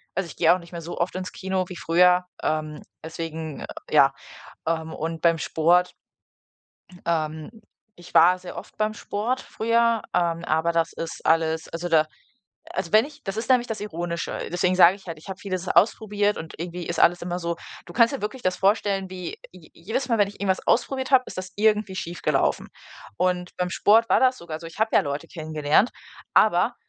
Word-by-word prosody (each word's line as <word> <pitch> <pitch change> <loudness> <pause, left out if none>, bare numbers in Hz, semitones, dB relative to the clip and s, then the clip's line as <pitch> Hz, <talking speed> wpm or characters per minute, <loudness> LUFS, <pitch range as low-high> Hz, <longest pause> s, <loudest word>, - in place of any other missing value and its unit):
also, 190 +1 -1
ich 150 - -11
gehe 165 0 +5
auch 185 - -1
nicht 170 0 -15
mehr 170 - -5
so 170 +2 -7
oft 175 +2 -1
ins 185 0 -4
Kino 190 -1 -2
wie 180 - -7
früher, 180 +3 +4 0.2
ähm, 155 -1 -2 0.2
deswegen, 160 -1 -6 0.3
ja. - - +5 0.5
Ähm, 160 -1 -1
und 165 +1 -4
beim 165 -1 +4
Sport 175 +3 +2 1.1
ähm, 155 -2 -2 0.5
ich 175 0 -14
war 180 +1 +6
sehr 180 -1 -9
oft - - -10
beim 215 0 0
Sport 225 +5 -2
früher, 230 0 +1
ähm, 170 -1 0
aber 160 +2 +1
das 165 0 +1
ist 165 0 -7
alles 160 0 +1
also, 170 +1 -4
da 155 -2 +4 0.6
also, 170 - -3
wenn 215 +1 +6
ich 295 0 -14
das 195 +2 -4
ist 225 +2 -4
nämlich 245 -1 +4
das 220 -2 -4
Ironische, 170 -3 -4
deswegen 180 +1 +1
sage 180 +1 +7
ich 195 -2 -17
halt, 165 - -5
ich 155 - -13
habe 190 -1 -6
vieles 185 -2 -4
ausprobiert 210 -1 +2
und 160 0 -8
irgendwie 175 0 -5
ist 170 -1 -2
alles 175 0 +4
immer 175 0 -3
so 170 -1 -2 0.3
Du 175 - -11
kannst 230 +2 +4
ja 270 - -8
wirklich 215 +5 -4
das 185 0 +1
vorstellen, 195 -1 +1
wie 180 -2 -6
je 175 -4 -16
jedes 225 +9 -3
Mal, 230 - +2
wenn 205 -2 +3
ich 205 - -10
irgendwas 190 -2 0
ausprobiert 260 +2 +1
habe, 255 -1 +6
ist - - -9
das 185 0 -5
irgendwie 210 -2 +2
schiefgelaufen. 175 -1 -1 0.5
Und 180 -1 -1
beim 180 0 -1
Sport 225 +5 +4
war - - +5
das 255 0 +3
sogar 160 -2 -7
so, - - -10
ich 165 +5 -12
habe 220 0 +1
ja - - +6
Leute 145 +3 -4
kennengelernt. 155 +5 +1 0.4
Aber, - - +4
180 Hz, 195 wpm, -24 LUFS, 165-205 Hz, 1.1 s, sage